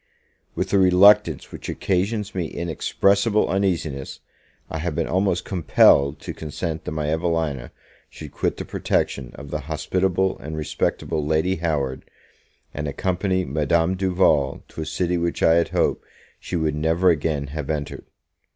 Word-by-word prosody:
WITH - - -2
a 100 - +5
reluctance 95 +2 +5
which - - -8
occasions 100 +3 -1
me 90 -3 -2
inexpressible 100 +6 +1
uneasiness, 85 -8 -1 0.5
I 80 - -5
have 85 -1 -3
been - - 0
almost 95 -1 0
compelled 75 -5 +4
to - - -6
consent 80 +1 -5
that - - -4
my 75 -1 -2
Evelina 80 -6 -1 0.4
should - - -10
quit - - -2
the - - -5
protection 65 -3 -1
of 70 -1 -10
the 75 - -2
hospitable 95 +4 0
and 80 +1 -6
respectable 75 0 -2
Lady 80 +5 +1
Howard, 75 -6 -2 0.7
and 75 +1 -4
accompany 95 +4 -1
Madame 80 +5 +1
Duval 90 -7 +1
to - - -7
a 80 - -4
city 90 0 -1
which 85 0 -2
I 80 - +6
had 85 0 +2
hoped - - 0 0.4
she - - -5
would 80 -3 0
never 80 +4 +2
again 75 -2 -1
have 75 -3 -5
entered. 75 -2 -4
80 Hz, 150 wpm, -23 LUFS, 75-95 Hz, 0.7 s, I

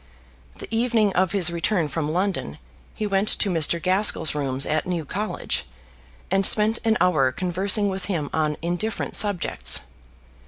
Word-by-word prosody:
The - - -8
evening 225 -4 +1
of 185 -1 +1
his 180 -3 +2
return 170 0 0
from 150 0 -3
London 180 - -2 0.4
he 215 - -3
went 195 0 0
to 200 - +1
Mr. 170 0 +2
Gaskell's 185 -2 +3
rooms 135 -2 -1
at 155 +2 -1
New 170 -4 -3
College, 210 +8 -3 0.7
and 195 +1 +2
spent 215 +3 +3
an 220 -1 +2
hour 155 -8 +2
conversing 190 - +1
with 190 -1 -3
him 165 -7 -2
on 155 -1 -1
indifferent 175 +6 -3
subjects. 205 -4 +2
185 Hz, 150 wpm, -23 LUFS, 160-205 Hz, 0.7 s, Gaskell's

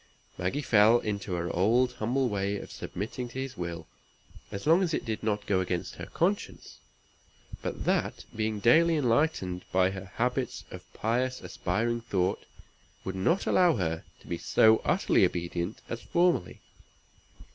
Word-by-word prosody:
Maggie 95 +12 -2
fell 110 0 +6
into 100 -4 -3
her 85 0 -3
old 120 +7 +3
humble 125 +4 0
way 100 -2 -1
of - - -9
submitting 115 +6 -5
to 130 - -6
his 135 0 -4
will, 85 -2 -5 0.7
as 100 - -6
long 165 +5 +5
as 170 -4 +1
it - - -3
did 110 -2 -3
not 105 -2 -1
go 95 -2 +2
against 90 -2 -3
her - - -7
conscience; 195 +5 -2 0.8
but - - -4
that, - - 0
being 110 -1 -1
daily 165 +10 +5
enlightened 115 - +1
by 95 0 +3
her 95 0 -7
habits 125 +2 -1
of - - -11
pious 125 +4 0
aspiring 120 +1 -2
thought, 95 -5 -1 0.6
would 95 - -4
not 130 - +1
allow 175 -4 +4
her 80 -4 -2 0.2
to - - -19
be 85 - -4
so 110 0 +5
utterly - - +3
obedient 85 +3 -2
as 120 0 -5
formerly. 175 - +1
110 Hz, 155 wpm, -29 LUFS, 95-130 Hz, 0.8 s, fell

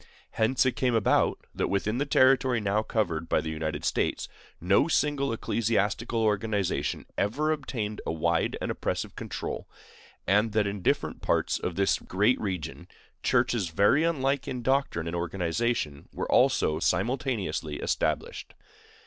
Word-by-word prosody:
Hence 125 +4 +2
it 130 -2 +1
came 125 -2 +1
about 110 - +2
that - - -1
within 105 +4 0
the 145 - -1
territory 130 -2 +4
now 105 0 +1
covered 85 -8 -2
by - - +3
the 80 - -4
United 80 0 -3
States - - 0 0.3
no 95 - +3
single 145 -4 +1
ecclesiastical 115 0 0
organization 105 -2 0
ever 145 +10 +1
obtained 120 -8 -3
a - - -2
wide 80 -1 0
and - - -1
oppressive - - -3
control, - - -5 0.6
and 105 +2 +2
that 110 -2 +2
in 100 -1 -3
different - - 0
parts - - +1
of 90 - -3
this 100 0 +2
great 105 +7 +1
region 95 -6 -4 0.3
churches 120 -7 +1
very 100 - +3
unlike 140 -5 0
in 125 -1 -4
doctrine 135 - +1
and 85 +1 -3
organization 85 -2 -2
were - - -4
almost 80 +2 +3
simultaneously 120 - -1
established. - - -2
110 Hz, 140 wpm, -28 LUFS, 95-130 Hz, 0.6 s, territory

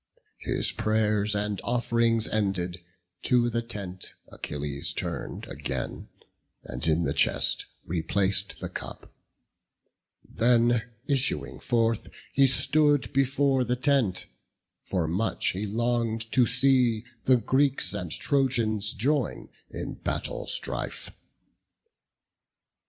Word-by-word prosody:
His - - 0
pray'rs 105 -1 +1
and 105 -1 -1
off'rings 115 -2 +1
ended, 90 -4 -1 0.4
to 120 -1 +2
the 115 - 0
tent 100 -6 -7
Achilles 70 -1 -4
turn'd - - -5
again, 65 -2 -4 0.6
and 65 +5 -4
in 80 +2 +3
the 70 -3 0
chest - - +1 0.2
Replac'd 95 +4 0
the - - -5
cup; - - -8 1.1
then 120 -1 +3 0.2
issuing 135 -2 0
forth, 115 -3 +1 0.3
he 135 0 +5
stood 145 +2 +3
Before 135 0 +2
the 125 +1 0
tent; 125 -7 +1 0.6
for 90 -4 -1
much 95 +8 0
he 100 +3 -2
long'd 115 0 -1
to 125 -3 +4
see 125 -5 +3 0.2
The 130 -1 +6
Greeks 135 +4 +1
and 90 -2 -3
Trojans 115 - +1
join 140 +8 -1 0.2
in - - -5
battle - - -3
strife. - - -2
115 Hz, 105 wpm, -27 LUFS, 100-125 Hz, 1.1 s, The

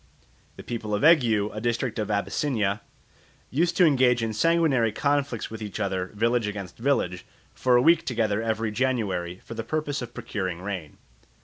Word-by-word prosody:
The - - -10
people 110 -3 -3
of 105 - -2
Egghiou, 115 -11 +4
a 105 - -4
district 120 0 -1
of 105 - -2
Abyssinia, 105 0 0 0.7
used 170 +5 +1
to 180 - +6
engage 125 -5 +3
in 110 -1 -1
sanguinary 140 -3 +2
conflicts 140 -2 -1
with 110 0 -7
each 105 -1 -5
other, 95 -3 -1
village 115 +1 +1
against 100 -3 -6
village, 115 -9 0 0.3
for 125 -1 +2
a 120 - +5
week 165 +1 +5
together 110 -4 0
every 110 -1 -1
January 105 -8 -1
for - - -7
the 115 0 -4
purpose 145 +1 -2
of 120 -1 -8
procuring 95 -4 -4
rain. 95 -7 -5
115 Hz, 170 wpm, -26 LUFS, 105-130 Hz, 0.7 s, to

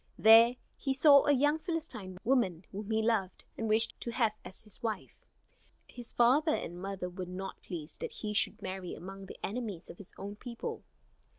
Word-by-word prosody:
There 225 +2 +8 0.2
he 270 -1 -1
saw 280 0 +7
a - - +6
young 290 +3 +3
Philistine 310 - -5
woman 205 -9 +1
whom 205 +2 -6
he 220 0 +1
loved, 215 -5 0
and 225 -1 -3
wished 220 +1 +4
to - - -4
have 230 -2 +2
as 190 - -10
his 210 -3 -14
wife. 220 -4 -3 0.7
His 240 -1 -7
father 285 +7 +4
and 175 +1 -6
mother 195 -1 -4
were 180 +1 -6
not 190 +1 -6
pleased 165 -4 -5
that - - -4
he 210 -1 -4
should 210 0 +1
marry 185 -1 -5
among 195 +2 -9
the - - -10
enemies 210 -5 -5
of - - -15
his 200 - -12
own 200 +1 -7
people. 235 0 -6
215 Hz, 185 wpm, -32 LUFS, 190-245 Hz, 0.7 s, There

